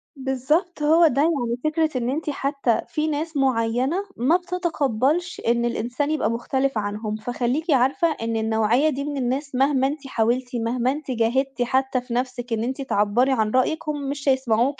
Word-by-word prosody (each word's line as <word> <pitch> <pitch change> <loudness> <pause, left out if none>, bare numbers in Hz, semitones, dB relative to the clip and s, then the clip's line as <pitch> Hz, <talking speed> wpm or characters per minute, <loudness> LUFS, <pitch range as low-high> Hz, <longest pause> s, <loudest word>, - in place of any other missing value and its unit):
بالضبط 280 +6 -1
هو 325 +3 +6
ده، 275 -1 +1
يعني 265 -7 +1
فكرة 310 -2 0
إن 245 0 -1
أنتِ 305 +3 -2
حتى 275 -4 0
في 305 0 -1
ناس 310 0 -2
معينة 255 +4 +1 0.2
ما 300 +9 +3
بتتقبلش 345 -3 -1
إن 235 0 +2
الإنسان 245 +5 -1
يبقى 310 -6 0
مختلف 265 +2 -1
عنهم، 210 +1 -3
فخلّيكِ 245 +8 -2
عارفة 270 +7 +3
إن 230 0 -2
النوعية 220 +6 +2
دي 280 -1 -3
من 290 -1 -3
الناس 270 +2 -2
مهما 270 0 +3
أنتِ 285 -1 -5
حاولتِ، 245 +1 0
مهما 245 +2 +1
أنتِ 290 -1 -5
جاهدتِ 245 +2 0
حتى 260 +1 +1
في 245 -1 -7
نَفْسِك 245 -1 -2
إن 225 0 -1
أنتِ 260 +3 -3
تعبّري 235 +1 +2
عن 220 -5 +1
رأيِِك، 305 +6 0
هُم 285 -2 -3
مش 280 0 -2
هيسمَعوكِ. 260 0 +1
265 Hz, 170 wpm, -23 LUFS, 240-295 Hz, 0.2 s, هو